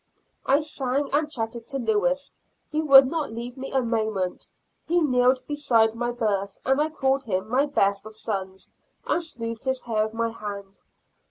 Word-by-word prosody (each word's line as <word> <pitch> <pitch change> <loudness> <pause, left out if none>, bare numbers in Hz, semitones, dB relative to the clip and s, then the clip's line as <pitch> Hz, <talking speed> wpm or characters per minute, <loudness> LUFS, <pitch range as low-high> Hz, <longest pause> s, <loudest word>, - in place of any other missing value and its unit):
I 280 +3 +4
sang 280 -2 -1
and 300 +1 +2
chatted 230 -4 -4
to 275 - -3
Lewis; 265 +4 0 0.4
he 305 +1 0
would 275 -3 +8
not 295 -2 -2
leave 235 +2 -6
me 270 0 -7
a 265 -1 +1
moment; 220 -5 -2 0.4
he 345 +2 +1
kneeled 255 -4 +2
beside 235 -7 +2
my 240 +1 -2
berth, 205 -5 -1
and 265 +2 +3
I 310 - +1
called 270 -3 0
him 190 -2 -1
my 260 +5 +2
best 200 -7 +1
of 220 - -10
sons, 190 -3 -5 0.3
and 345 - +1
smoothed 230 -7 -6
his 260 -1 -1
hair 215 -2 0
with 220 +1 -7
my 230 0 0
hand. 200 -3 -8
240 Hz, 175 wpm, -25 LUFS, 220-275 Hz, 0.4 s, would